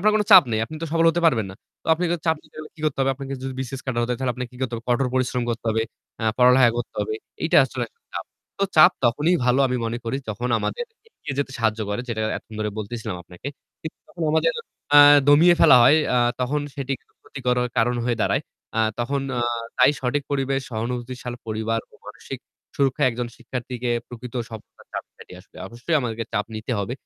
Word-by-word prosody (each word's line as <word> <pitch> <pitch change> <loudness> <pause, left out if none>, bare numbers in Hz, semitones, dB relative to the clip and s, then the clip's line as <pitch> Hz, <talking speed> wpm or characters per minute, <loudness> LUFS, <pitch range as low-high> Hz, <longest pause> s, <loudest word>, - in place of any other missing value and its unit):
আপনার 215 +3 +4
কোনো 210 - +1
চাপ 185 - +11
নেই, 110 - +1
আপনি 155 - -10
তো - - -1
সফল 165 0 +3
হতে 175 - -1
পারবেন 115 -10 +2
না। - - -10 0.3
তো - - -19
আপনি 175 +3 -2
তো - - +1
চাপ 160 0 +3
নিতে - - -24
গেলে 155 0 -7
কি 160 - -16
করতে 150 -3 -1
হবে 135 0 +3
আপনাকে 135 0 -7
যদি 135 0 -4
BCS 130 0 -4
ক্যাডার 125 -3 -1
হতে 120 - -2
হয়? 120 - -4
তাহলে 130 -2 0
আপনাকে 125 0 -5
কি - - -13
করতে 125 -2 -2
হবে? 115 - -9
কঠোর 125 +2 +2
পরিশ্রম 125 -1 0
করতে 115 0 -4
হবে, 110 0 +1 0.4
অ্যা 110 - -2
পড়ালেখা 125 0 +6
করতে 120 - -5
হবে, 435 - -2 0.3
এইটা - - +2
আসলে - - -4
একটা 465 - -46
চাপ। - - -4 0.3
তো 200 - +2
চাপ 155 - +9
তখনই 150 +9 +3
ভালো 125 +2 +3
আমি 125 -1 -1
মনে 115 +1 -2
করি 115 +3 -2
যখন 115 +4 -3
আমাদের 480 - -3 0.2
এগিয়ে 145 - -8
যেতে 140 -1 -1
সাহায্য 110 -1 0
করে 105 - -2
যেটা 110 -2 -2 0.2
এতক্ষণ 110 - -11
ধরে 105 0 -1
বলতেছিলাম 110 -1 -5
আপনাকে। 90 +9 -9 0.3
কিন্তু 160 - -7
তখন 170 - -8
আমাদের 160 +1 +2 0.4
আ - - +11 0.3
দমিয়ে 165 +5 +7
ফেলা - - +8
হয় 140 +6 +7 0.2
আ - - +5 0.2
তখন 140 +4 0
সেটি 140 -1 -3
কারো - - -37
ক্ষতি 140 - -10
করার 125 0 +2
কারণ 120 +2 +2
হয়ে 120 -1 0
দাঁড়ায়। - - +1 0.3
আ - - +1 0.2
তখন 135 +4 -1 0.2
আ - - 0 0.4
তাই 125 - +7
সঠিক 135 +2 0
পরিবেশ 135 -1 0
সহানুভূতিশীল 120 +2 -4
পরিবার 110 +1 -1
ও - - -20
মানসিক - - -8 0.4
সুরক্ষায় 135 -2 +2
একজন 120 +1 -3
শিক্ষার্থীকে 125 0 -5 0.2
প্রকৃত 120 0 -9 0.2
সফলতার 110 -2 -12
চাপ - - -4
কাটিয়ে 90 - -12
আসবে। 100 - -21
অবশ্যই 120 +8 -3
আমাদেরকে 115 -2 -3
চাপ 105 +1 -1
নিতে 110 +3 -4
হবে। 100 +4 -3
125 Hz, 220 wpm, -23 LUFS, 115-140 Hz, 0.4 s, চাপ